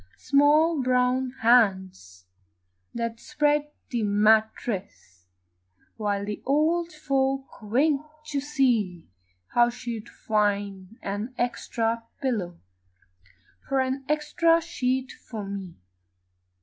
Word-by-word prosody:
Small 295 +2 +4
brown 255 0 +1
hands 190 - +2 0.7
that 230 -1 -3
spread 295 -1 +1 0.2
the 240 -2 0
mattress 205 - 0 0.7
While 205 -2 -1
the 210 0 -5
old 325 +5 +1
folk 270 -3 -1
winked 300 +7 0
to 285 - 0
see 245 - 0 0.4
How 240 0 +4
she'd 235 -2 -6
find 205 -1 -1
an 205 +6 -4
extra 230 -1 -1 0.2
pillow 205 -11 -2 1.1
And 265 -1 +1
an 270 - -19
extra 305 +2 +3
sheet 260 -5 -2
for 215 -4 -8
me. 195 -3 -6
240 Hz, 95 wpm, -26 LUFS, 205-280 Hz, 1.1 s, Small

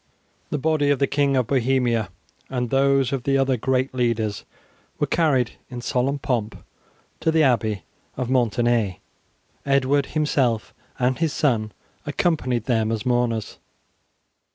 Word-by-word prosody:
The - - -1
body 150 0 +1
of 145 - +3
the 140 - +2
King 140 -1 +1
of 125 - +2
Bohemia 125 -4 +1 0.4
and 125 -2 -2
those 135 -1 +3
of 135 - -1
the 135 +2 +1
other 135 -1 +2
great 130 +2 0
leaders 115 -4 -1 0.5
were - - +1
carried 140 -8 +2 0.2
in 125 -2 -6
solemn 130 +3 0
pomp 125 -7 -2 0.6
to - - 0
the 160 -1 +3
Abbey 110 -6 +1 0.3
of 125 -2 -2
Maintenay. 120 -5 +1 0.7
Edward 140 0 +2
himself 135 -7 0 0.2
and 125 +1 0
his 160 -3 0
son 115 -8 +1 0.3
accompanied 145 - 0
them 110 -2 +1
as 110 -2 -3
mourners. 120 -3 0
130 Hz, 135 wpm, -23 LUFS, 120-140 Hz, 0.7 s, of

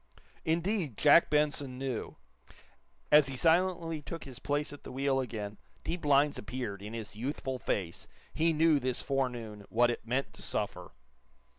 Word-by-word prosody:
Indeed, 165 - 0
Jack 150 +3 +6
Benson 145 -3 +1
knew! 130 -3 -4 0.9
As 150 -1 +7
he 135 -1 -4
silently 165 0 +2
took 165 +2 -6
his 130 -3 -10
place 145 +1 -1
at 145 - -12
the - - -8
wheel 135 +1 +1
again 105 -5 -4 0.2
deep 175 0 -3
lines 145 0 +4
appeared 105 -3 -5
in 105 +3 -7
his 110 -2 -6
youthful 130 +2 -3
face. 90 -7 -3 0.3
He 165 +1 +2
knew, 160 -1 +4
this 130 -1 -2
forenoon, 120 -6 -2
what 120 +1 +4
it - - -4
meant 130 +4 -1
to - - -13
suffer. - - -3
135 Hz, 155 wpm, -31 LUFS, 120-150 Hz, 0.9 s, As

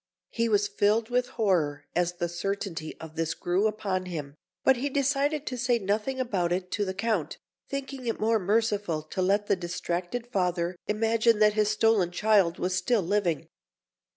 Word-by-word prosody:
He 230 -1 0
was 205 -1 +3
filled 210 +3 +1
with 250 0 +2
horror 155 -10 +1
as 175 0 +1
the 175 0 -2
certainty 175 -2 -4
of 160 -1 -10
this 165 0 -1
grew 185 +5 +1
upon 195 -3 -2
him, 150 -5 -5 0.3
but 265 -1 +5
he 275 +4 -1
decided 285 +2 +1
to 250 -1 -4
say 245 0 +2
nothing 215 +6 -1
about 195 -9 0
it 180 +1 -2
to 205 - 0
the 190 0 -4
Count, 205 -5 -1 0.3
thinking 275 -2 -5
it 230 - -1
more 220 +1 +2
merciful 205 -5 0
to 170 +4 -4
let 200 +3 +2
the 200 - +2
distracted 175 +5 -3
father 180 -6 -1
imagine 225 +1 +2
that 210 0 +5
his 210 -1 +2
stolen 215 -4 +3
child 195 -2 +3
was 185 +1 -1
still 195 +4 +1
living. 180 -3 0
205 Hz, 175 wpm, -28 LUFS, 175-230 Hz, 0.3 s, but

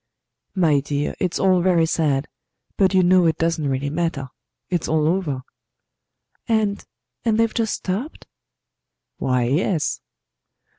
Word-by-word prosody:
"My 160 -6 +3
dear, 145 +1 -2
it's 180 -2 -1
all 185 -2 +3
very 175 -2 +3
sad; 150 -3 0 0.5
but 190 -1 +2
you 185 - +5
know 180 -1 +5
it 160 -1 +1
doesn't 165 -2 0
really 135 +1 -2
matter. 155 -5 -2 0.4
It's 175 -3 -1
all 155 -1 +2
over." 160 -7 -1 1.0
"And 215 -3 0 0.4
and 225 -1 +1
they've 230 -1 +2
just 225 -2 0
stopped?" 210 - -4 0.9
"Why, 125 -2 +1
yes." 155 - 0
170 Hz, 130 wpm, -22 LUFS, 145-190 Hz, 1.0 s, you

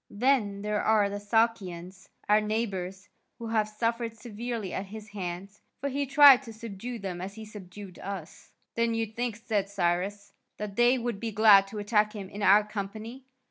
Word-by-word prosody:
Then 205 -4 +1
there 210 0 0
are 210 -2 +3
the 205 - -4
Sakians, 200 -4 -1 0.2
our 210 +1 +5
neighbours, 200 -3 -3 0.3
who 230 -1 -6
have 215 -2 +1
suffered 230 +1 -2
severely 225 -2 -5
at 190 - -4
his 215 +2 -10
hands, 195 0 -6 0.2
for 280 - -2
he 280 +1 -2
tried 275 -1 +8
to 230 -4 -10
subdue 230 +2 -7
them 190 -4 -5
as 195 +2 -6
he 220 0 -8
subdued 200 -2 -11
us." 190 -5 -8 0.2
"Then 230 0 0
you 225 0 0
think," 230 +1 -3
said 210 -3 -2
Cyrus, 195 +2 -1 0.2
"that 205 -1 -6
they 240 +3 +4
would 235 -4 -3
be 230 0 -3
glad 205 -2 +6
to 210 - -8
attack 210 0 +1
him 200 -3 -7
in 205 - -8
our 205 +1 +6
company?" 215 +5 -7
210 Hz, 180 wpm, -28 LUFS, 200-230 Hz, 0.3 s, tried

